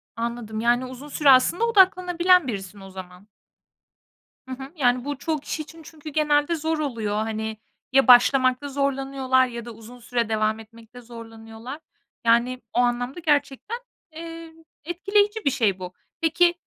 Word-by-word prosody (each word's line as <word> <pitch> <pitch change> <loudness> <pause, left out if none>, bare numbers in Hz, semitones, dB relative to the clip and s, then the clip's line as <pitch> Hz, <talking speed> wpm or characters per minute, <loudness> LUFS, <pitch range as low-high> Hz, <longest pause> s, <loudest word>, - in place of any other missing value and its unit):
Anladım. 230 -1 -4
Yani, 240 +2 +2
uzun 260 +3 -10
süre 295 -1 +2
aslında 270 - +5
odaklanabilen 365 -4 +4
birisin 200 -3 -6
o 195 - -11
zaman. 185 +1 -11 1.2
Hı - - -9
hı, 265 +1 -10
yani, 250 -3 +1
bu 290 -2 -3
çoğu 315 +1 -2
kişi 310 +2 -5
için 320 +2 -12
çünkü 310 0 -11
genelde 300 +2 +1
zor 320 0 -2
oluyor. 230 -8 -2
Hani, 220 0 -3 0.3
ya 270 +1 +4
başlamakta 255 +2 +5
zorlanıyorlar 270 -2 +1
ya 235 -1 -7
da 240 - -8
uzun 225 +2 -13
süre 235 -1 -2
devam 215 0 0
etmekte 225 +2 -14
zorlanıyorlar. 230 +3 -10 0.5
Yani, 240 +2 +2
o - - +1
anlamda 245 +4 0
gerçekten, 295 - -1 0.4
eee, 330 0 -9 0.3
etkileyici 405 +5 0
bir 280 - +3
şey 215 -8 0
bu. 180 0 -7 0.3
Peki, 335 +2 +3
255 Hz, 150 wpm, -24 LUFS, 230-310 Hz, 1.2 s, aslında